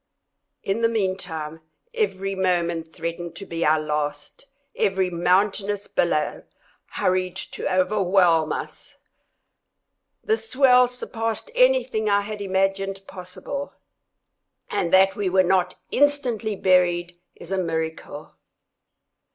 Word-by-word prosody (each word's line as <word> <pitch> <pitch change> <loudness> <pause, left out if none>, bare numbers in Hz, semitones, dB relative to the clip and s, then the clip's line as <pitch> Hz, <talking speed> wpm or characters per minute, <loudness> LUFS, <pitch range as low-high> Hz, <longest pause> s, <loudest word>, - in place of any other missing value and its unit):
In 200 +4 -1
the 230 - +3
meantime 175 -7 -3 0.3
every 195 - -1
moment 170 -3 0
threatened 170 +1 -5
to 195 - -8
be 165 -2 -3
our 155 +1 +4
last—every 180 - -3
mountainous 195 +3 +1
billow 155 -3 0 0.5
hurried 185 -1 0
to - - -5
overwhelm 185 -4 +3
us. - - -6 1.3
The 440 +1 +1
swell 255 - +4
surpassed 230 - -4
anything - - +3
I 200 0 +3
had 210 0 -6
imagined 195 0 -1
possible, 195 +11 -7 1.0
and 170 - -1
that 190 +1 +5
we 200 -2 -1
were 185 +1 +4
not 180 0 +1 0.2
instantly 250 -7 +1
buried 175 -2 +2 0.2
is 175 - -12
a 190 - 0
miracle. 160 -3 -4
190 Hz, 105 wpm, -23 LUFS, 175-215 Hz, 1.3 s, that